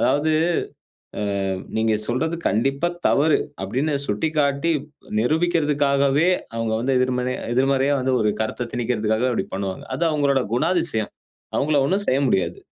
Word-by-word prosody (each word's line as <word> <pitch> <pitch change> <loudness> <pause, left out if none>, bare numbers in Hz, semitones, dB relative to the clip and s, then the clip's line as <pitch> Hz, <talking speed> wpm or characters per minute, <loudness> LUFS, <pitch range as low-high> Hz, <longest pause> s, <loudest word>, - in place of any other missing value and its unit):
அதாவது, 150 +2 +2 1.2
அ - - -1 0.3
நீங்கச் 110 -1 +1
சொல்றது 145 +8 -1
கண்டிப்பா 135 - +1 0.2
தவறு: 150 +2 +3 0.2
அப்பிடின்னு 145 +3 -1
சுட்டிக்காட்டி 145 +6 +1 0.5
நிரூபிக்கிறதுக்காகவே, 145 0 +2 0.3
அவுங்க 115 +3 0
எதிர்மறையா 125 0 -1
எதிர்மறையா 135 +2 +2 0.3
ஒரு 105 -1 +2
கருத்தத் 115 +2 -3
திணிக்கிறதுக்காக 115 0 0
அப்பிடி 110 - -2
பண்ணுவாங்க. 95 -1 -4
அது 170 - 0
அவுங்களோட 140 -3 +2
குணாதிசயம். 160 - 0 0.4
அவுங்களை 145 -1 +2
ஒண்ணும் 195 +4 0
செய்ய 135 +2 +2
முடியாது. 95 - 0
135 Hz, 115 wpm, -22 LUFS, 115-150 Hz, 1.2 s, தவறு